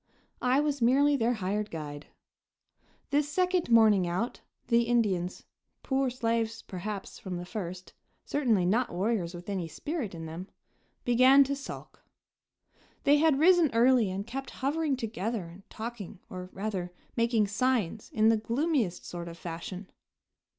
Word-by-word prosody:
I 255 +3 +3
was 290 -3 -1
merely 280 +5 +4
their 240 -1 +1
hired 210 +1 -2
guide. 150 -2 -7 1.0
This 290 +1 +2
second 360 0 +1
morning 215 -5 +5
out, 185 +8 -2 0.3
the 235 -1 +4
Indians 200 -7 0 0.4
poor 265 -1 +1
slaves, 230 -2 -1
perhaps, 195 +2 -6
from 185 -2 -5
the 175 - -6
first, 185 -2 -6 0.3
certainly 235 -11 +2
not 230 +7 +1
warriors 185 -2 -1
with 175 0 -10
any 190 -4 -2
spirit 255 - -4
in 165 -1 -7
them 165 +4 -7 0.6
began 255 +3 +7
to 280 +1 -2
sulk. 275 - -9 1.0
They 290 +1 +5
had 305 -2 +4
risen 345 0 +5
early 240 -2 +5
and 195 +2 -4
kept 265 +3 -5 0.2
hovering 300 0 +1
together 225 -2 -3
and 175 +3 -13
talking, 220 -4 -7
or, 185 0 -7
rather, 190 -3 -4 0.2
making 230 -2 +2
signs 220 -1 0
in 220 +1 +4
the 225 - +4
gloomiest 235 - -1
sort 175 -1 -6
of 170 0 -8
fashion. 180 +3 -6
225 Hz, 145 wpm, -29 LUFS, 185-260 Hz, 1.0 s, began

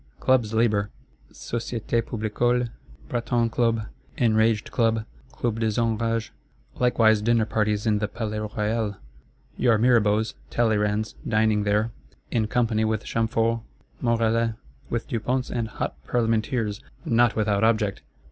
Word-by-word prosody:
Clubs 120 - +2
labour: 110 -2 +2 0.4
Societe 115 0 -2
Publicole; 120 +2 0 0.4
Breton 120 -1 0
Club; 115 -2 +1 0.3
Enraged 110 -4 +2
Club, 115 -2 +1 0.3
Club 120 -3 -2
des 110 0 0
Enrages. 115 0 0 0.5
Likewise 115 -3 +4
Dinner 115 0 +3
parties 105 -1 0
in 105 -2 +2
the 105 - -1
Palais 110 0 -4
Royal; 105 0 -1 0.6
your 120 -3 +4
Mirabeaus, 110 -2 +3 0.2
Talleyrands 105 -2 +1
dining 110 -1 +2
there, 105 +3 +1 0.4
in 110 -2 +1
company 110 -1 +1
with 110 -1 0
Chamforts, 115 0 0 0.4
Morellets, 115 -1 +1 0.3
with 115 -1 -2
Duponts 125 +1 -1
and 115 -2 -1
hot 110 - -4
Parlementeers, 115 -1 0 0.2
not 120 0 +3
without 105 -1 +1
object! 110 -3 +2
115 Hz, 120 wpm, -25 LUFS, 110-115 Hz, 0.6 s, Likewise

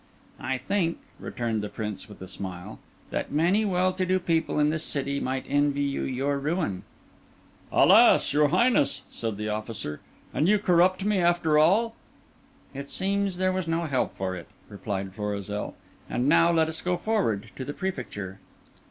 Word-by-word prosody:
"I 130 0 -2
think," 170 +5 -1 0.2
returned 115 -3 -2
the 105 - -4
Prince 105 -3 -5
with 105 - -11
a - - -8
smile, 90 -1 -7 0.3
"that - - -3
many 180 +8 +2
well 185 -1 +2
to 185 0 -1
do 185 0 +2
people 165 -4 0
in 150 0 +3
this 160 0 -2
city 140 -2 -2
might 130 0 -2
envy 145 0 +1
you 140 -1 -1
your 140 +2 -1
ruin." 145 - -1 0.9
"Alas! - - +6
your 150 0 +4
Highness!" 235 - +2
said 110 -3 -4
the 105 0 -3
officer, 105 -7 -4 0.3
"and 160 - +2
you 210 - +5
corrupt 185 0 +3
me 210 -2 +2
after 170 -3 +3
all?" 210 +9 +4 0.8
"It 140 +1 -7
seems 195 -1 0
there 185 0 +2
was 185 -2 -2
no 165 +1 0
help 135 -5 -1
for 95 -1 -2
it," 85 - -9 0.2
replied 95 -1 -4
Florizel. 105 0 -4 0.3
"And 125 +2 0
now 165 +3 +5
let 160 -1 +3
us 160 0 -3
go 180 0 0
forward 190 - -1
to 130 - -5
the 145 - -4
Prefecture." 120 - -5
145 Hz, 170 wpm, -26 LUFS, -, 0.9 s, Alas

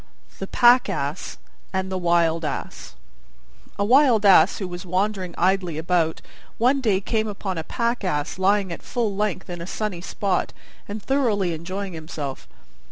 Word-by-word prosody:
THE 195 - -4
PACK 245 +3 +5
ASS - - -3 0.3
AND 190 0 -2
THE 190 - -1
WILD 170 -1 +2
ASS 145 - -5 0.8
A 200 - +1
Wild 245 -3 +5
Ass, 195 -2 +6
who 190 - -4
was 175 0 -7
wandering 185 0 -1
idly 180 -3 +1
about, 165 0 0 0.4
one 260 +4 +3
day 210 -6 +2
came 220 +2 -1
upon 195 -4 -4
a - - -4
Pack 235 +6 -2
Ass 150 -2 -2
lying 195 0 +2
at 170 - -6
full 225 -5 -2
length 210 -2 -2
in 175 -2 -6
a 170 - -6
sunny 205 -4 -3
spot 190 0 -1 0.3
and 205 +1 -6
thoroughly 220 -10 +1
enjoying 185 +4 -5
himself. 155 -4 -6
190 Hz, 160 wpm, -23 LUFS, 175-215 Hz, 0.8 s, Ass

